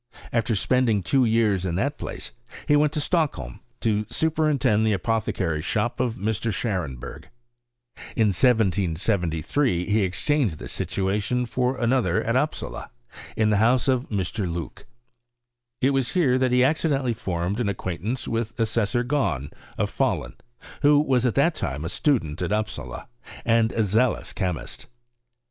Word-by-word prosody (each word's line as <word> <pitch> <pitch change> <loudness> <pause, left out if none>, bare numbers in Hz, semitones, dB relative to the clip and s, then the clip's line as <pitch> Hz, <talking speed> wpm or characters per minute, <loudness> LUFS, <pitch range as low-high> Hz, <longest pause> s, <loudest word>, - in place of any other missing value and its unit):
After 115 -1 +1
spending 115 -2 +2
two 130 +7 +3
years 110 -5 +2
in 90 -3 -2
that 140 - -1
place, - - -5 0.4
he 145 - +5
went 150 0 +3
to 155 - 0
Stock 155 0 +1
holm, - - -8 0.2
to 105 -1 0
superintend 150 -8 +2
the 110 -1 +2
apothecary's 95 -6 -1
sbop - - -1
of 120 -2 0
Mr. 110 +3 -1
Scharenberg. 80 - -4 0.9
In 110 -2 +3
1773 95 - +1
he 110 +1 +3
exchanged 100 - 0
this - - -8
situation 105 +6 -1
for 125 +2 -1
another 120 -7 +1
at - - 0
Upsala, - - -2 0.5
in 110 -1 +3
the 105 - +3
house 120 +5 +3
of 130 -1 +1
Mr. 95 -2 -2
Loock. 85 +2 -6 0.9
It 135 +2 +3
was 135 -2 0
here 135 -8 +3
that 130 -1 +2
he 125 0 +4
accidentally 140 -3 +1
formed 95 -2 -2
an 115 -4 0
ac 100 - -2
quaintance 100 +8 -3
with 115 0 -3
Assessor 115 +1 +1
Gahn, 125 - -1 0.3
of - - -1
Fahlun, - - -1 0.5
who 145 0 +6
was 130 -4 +2
at 115 - -1
that 150 +5 +3
time 75 - -4
a - - -2
student 90 - 0
at 90 - -2
Upsala, 110 0 -3 0.4
and 115 -1 +3
a 115 - +1
zealous 110 +5 +1
chemist. 90 -5 -4
110 Hz, 150 wpm, -24 LUFS, 95-130 Hz, 0.9 s, who